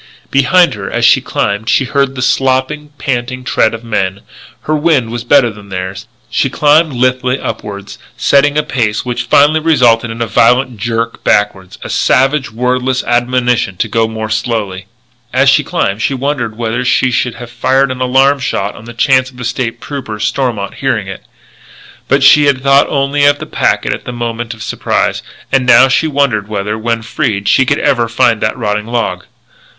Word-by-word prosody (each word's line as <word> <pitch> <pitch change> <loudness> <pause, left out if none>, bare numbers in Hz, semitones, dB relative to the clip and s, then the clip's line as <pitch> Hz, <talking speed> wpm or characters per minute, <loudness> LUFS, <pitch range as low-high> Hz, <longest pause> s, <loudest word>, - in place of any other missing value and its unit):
Behind 170 +7 +3
her 105 -2 -6
as - - 0
she - - +5
climbed 100 +3 -2
she 135 - +2
heard 140 0 0
the 130 - -3
slopping, 135 +4 0
panting 130 -1 -3
tread 115 -3 +1
of 115 - -10
men; 100 -4 -2 0.4
her 155 - -1
wind 145 -7 +1
was 120 0 -4
better 120 -1 +3
than 105 -1 -14
theirs; 95 +2 -6 0.2
she 135 - 0
climbed 150 +3 +3
lithely 125 +1 0
upward, 100 -1 -6 0.2
setting 145 +1 +2
a 150 - +2
pace 120 -8 -2
which 125 0 -3
finally 150 +5 +4
resulted 125 -8 +2
in 115 +1 -7
a 115 - 0
violent 125 +2 +2
jerk 115 +1 -3
backward, 95 -3 0
a - - -7
savage, 135 +2 +1
wordless 125 +2 -1
admonition 120 -4 0
to 110 - -1
go 115 +1 0
more 110 -1 -5
slowly. 105 -4 -3 0.4
As 135 +1 +3
she 135 - +3
climbed 105 - -2
she 135 - 0
wondered 130 -5 -3
whether 115 -1 -2
she 125 +1 +1
should 125 0 -1
have 120 -1 -10
fired 130 +3 +1
an 130 0 -6
alarm 135 +2 +3
shot 105 -4 -2
on 110 - -13
the 120 0 -10
chance 130 +2 +2
of 130 - -18
the 125 - -6
State 115 0 -3
Trooper, 125 -6 -6
Stormont, 115 -2 -2
hearing - - -2
it. - - -8 0.8
But 140 0 +2
she 145 +2 +6
had 135 -2 +1
thought 140 0 +4
only 140 +1 0
of 145 0 +4
the - - -7
packet - - 0
at - - -8
the - - -5
moment 120 -1 -4
of 110 - -9
surprise. 110 - -1 0.3
And 135 -1 +2
now 125 +2 +7
she 135 +5 +1
wondered 140 -9 0
whether, 105 0 -3
when 115 +1 -2
freed, 110 -5 -2
she 130 +5 +3
could - - +2
ever 120 -4 +1
again 115 - -9
find 115 -2 +2
that 110 - -1
rotting 105 -2 -2
log. 115 -7 -2
120 Hz, 185 wpm, -13 LUFS, 110-135 Hz, 0.8 s, now